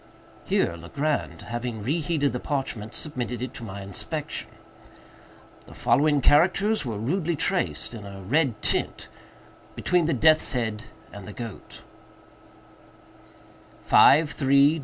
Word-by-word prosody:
Here 85 - +1
Legrand, 140 - -3
having 120 -2 -5
re 145 +9 0
heated 145 -3 0
the 125 - -2
parchment, 120 -6 -4
submitted 125 -5 -3
it 125 - -5
to 135 - -8
my 100 -2 -7
inspection. 95 -1 -4 1.2
The - - -13
following 145 0 +2
characters 190 - +3
were 115 -6 -4
rudely 165 - -1
traced, 180 -4 -1
in 110 -3 -8
a 100 -1 -9
red 130 - +1
tint, - - -1 0.7
between 180 -2 +1
the 165 - +1
death's 155 -2 +4
head 115 -3 -2 0.3
and 100 -2 -9
the 105 - -8
goat: 115 -3 -9 2.0
"53‡‡†305))6*;4826)4‡.) 145 0 +5
135 Hz, 120 wpm, -25 LUFS, 110-155 Hz, 2.0 s, 53‡‡†305))6*;4826)4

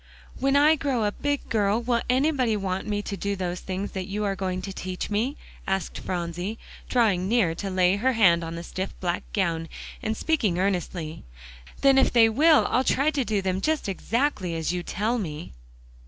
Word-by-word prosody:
"When 275 +1 +2
I 300 +2 +5
grow 270 -6 0
a 205 - +1
big 285 +5 -2
girl, 210 -1 +2
will 235 0 0
anybody 255 -4 +2
want 190 0 -3
me 205 -1 -1
to 200 - -4
do 200 +1 -2
those 180 -2 -3
things 190 +2 -4
that 190 -1 -4
you 210 +1 -3
are 200 -1 0
going 185 -1 -3
to 195 0 -5
teach 185 +2 -5
me?" 235 +8 0 0.3
asked 190 0 -2
Phronsie, 175 +4 -3 0.3
drawing 200 -7 +2
near 215 -8 +3
to 195 +4 -5
lay 185 0 +3
her 260 +5 +2
hand 175 -7 +4
on 165 0 -5
the 170 - -6
stiff 185 +2 -5
black 175 -1 -1
gown, 165 -5 -1 0.3
and 220 0 -2
speaking 225 - +1
earnestly. 180 -4 -2 0.6
"Then 270 -1 +6
if - - +3
they 230 -2 +6
will, 305 +7 +5
I'll 255 - +3
try 280 +3 +2
to 280 -3 0
do 210 -4 -1
them 190 0 -1
just 315 -1 0
exactly 200 - -1
as 165 +1 -1
you 180 - -2
tell 220 +7 -1
me." 155 -5 -5
200 Hz, 195 wpm, -25 LUFS, 185-245 Hz, 0.6 s, Then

